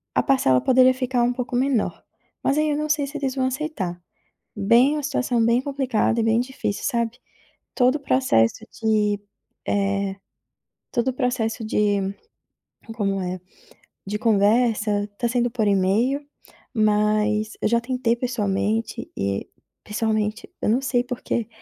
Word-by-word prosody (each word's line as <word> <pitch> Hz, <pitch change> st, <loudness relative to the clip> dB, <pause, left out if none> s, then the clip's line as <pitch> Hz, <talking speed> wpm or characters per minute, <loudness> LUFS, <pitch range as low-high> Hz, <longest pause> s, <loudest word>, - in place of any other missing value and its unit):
a -, -, +3 dB
parcela 130 Hz, -, +3 dB
poderia 255 Hz, 0 st, +5 dB
ficar 255 Hz, -1 st, 0 dB
um 245 Hz, +1 st, +2 dB
pouco 250 Hz, 0 st, -4 dB
menor, 255 Hz, -3 st, 0 dB, 0.4 s
mas 275 Hz, -, +1 dB
aí 305 Hz, 0 st, +2 dB
eu 290 Hz, -, 0 dB
não 305 Hz, 0 st, -1 dB
sei 295 Hz, -1 st, +2 dB
se 290 Hz, +2 st, -6 dB
eles 270 Hz, -2 st, -2 dB
vão 260 Hz, -1 st, +1 dB
aceitar. 255 Hz, -, -4 dB, 0.5 s
Bem 230 Hz, +7 st, +4 dB
uma 305 Hz, -, -2 dB
situação 250 Hz, -4 st, 0 dB
bem 235 Hz, +2 st, +3 dB
complicada 260 Hz, -5 st, 0 dB
e -, -, +2 dB
bem 225 Hz, +1 st, +3 dB
difícil, 250 Hz, -5 st, -3 dB
sabe. 235 Hz, -3 st, -1 dB, 0.6 s
Todo 255 Hz, +2 st, +3 dB
o -, -, -6 dB
processo 225 Hz, -, +2 dB, 0.2 s
de 210 Hz, -2 st, +2 dB, 0.5 s
eh, 200 Hz, -1 st, 0 dB, 0.8 s
todo 240 Hz, 0 st, +1 dB
o -, -, -2 dB
processo 245 Hz, -3 st, -1 dB
de 210 Hz, -1 st, +1 dB, 1.0 s
como 195 Hz, -3 st, 0 dB
é, 180 Hz, 0 st, -4 dB, 0.7 s
de 205 Hz, +2 st, -2 dB
conversa 210 Hz, -1 st, +2 dB
tá 240 Hz, -, 0 dB
sendo 240 Hz, 0 st, 0 dB
por 225 Hz, -3 st, 0 dB
e-mail, 205 Hz, +8 st, +2 dB, 0.5 s
mas 215 Hz, -1 st, +2 dB
eu -, -, +2 dB
já 235 Hz, +1 st, +2 dB
tentei 250 Hz, -1 st, 0 dB
pessoalmente, 220 Hz, -2 st, -2 dB
e 100 Hz, 0 st, -2 dB, 0.3 s
pessoalmente 215 Hz, 0 st, -1 dB
eu -, -, +1 dB
não 240 Hz, +5 st, +2 dB
sei 250 Hz, -2 st, +1 dB
por 250 Hz, -1 st, -6 dB
quê, 230 Hz, -, -2 dB
230 Hz, 150 wpm, -23 LUFS, 210-255 Hz, 1.0 s, poderia